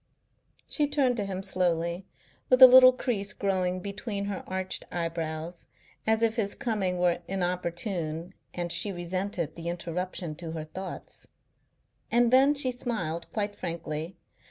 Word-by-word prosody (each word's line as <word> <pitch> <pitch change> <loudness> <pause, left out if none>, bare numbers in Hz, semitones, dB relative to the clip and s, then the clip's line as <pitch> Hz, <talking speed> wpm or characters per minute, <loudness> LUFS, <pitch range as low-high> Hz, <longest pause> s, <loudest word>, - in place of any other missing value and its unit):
She 295 -2 +1
turned 280 -4 +2
to 205 - -1
him 190 -1 -4
slowly, 175 -1 -1 0.4
with 255 - +5
a - - +15
little 255 0 +9
crease 215 -6 -2
growing 185 -2 -1
between 200 +1 -4
her 200 -2 -4
arched 190 0 -3
eyebrows, 165 0 -4 0.4
as 220 +1 +3
if 225 0 +2
his 200 -3 0
coming 210 -8 -1
were 175 -1 +2
inopportune 175 -2 -2 0.2
and 175 -1 -3
she 200 +4 0
resented 180 -1 -3
the 170 0 -5
interruption 175 -1 -4
to 165 -2 -6
her 160 -1 -4
thoughts, 185 +4 -8 0.8
and 240 0 +4
then 275 +3 +6
she 270 -3 0
smiled 180 -10 -3
quite 205 -1 -2
frankly. 165 0 -5
185 Hz, 140 wpm, -28 LUFS, 170-215 Hz, 0.8 s, a